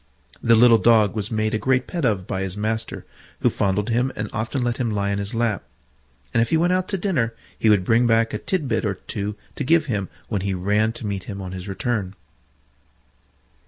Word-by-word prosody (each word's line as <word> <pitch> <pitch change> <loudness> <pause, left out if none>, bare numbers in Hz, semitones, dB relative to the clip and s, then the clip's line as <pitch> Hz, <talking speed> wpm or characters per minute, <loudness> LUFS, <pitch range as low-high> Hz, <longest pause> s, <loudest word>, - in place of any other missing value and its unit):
The 115 0 +5
little 115 0 +7
Dog 110 -4 +4
was 105 0 -3
made 110 -1 0
a 110 - +1
great 130 +1 +1
pet 170 -5 -2
of 100 -6 +1
by 95 0 -3
his 95 0 -4
master, 110 +1 -3 0.4
who - - +3
fondled 100 +2 0
him 125 +3 +1
and 110 -1 -4
often 120 +4 -2
let 120 -1 0
him 125 -3 -1
lie 100 -2 -1
in 100 - -1
his 100 +3 -4
lap; 115 -3 0 0.7
and 115 - +3
if 115 - +1
he 160 - +3
went 175 +3 +2
out 185 0 0
to 195 - -1
dinner, 140 - 0 0.2
he 110 - +3
would 100 -4 +4
bring 120 +3 +4
back 115 0 +2
a - - -2
tit 185 -7 -1
bit 115 -1 0
or 100 -3 -1
two 105 +2 -5 0.2
to - - -4
give 160 +3 +3
him 105 -8 -2 0.2
when 105 -4 -2
he 95 0 -1
ran 105 +4 +1
to 115 - -7
meet 100 -2 -3
him 100 -1 -6
on 95 -1 -6
his 95 +1 -7
return. 100 -1 -2
110 Hz, 225 wpm, -23 LUFS, 100-120 Hz, 0.7 s, little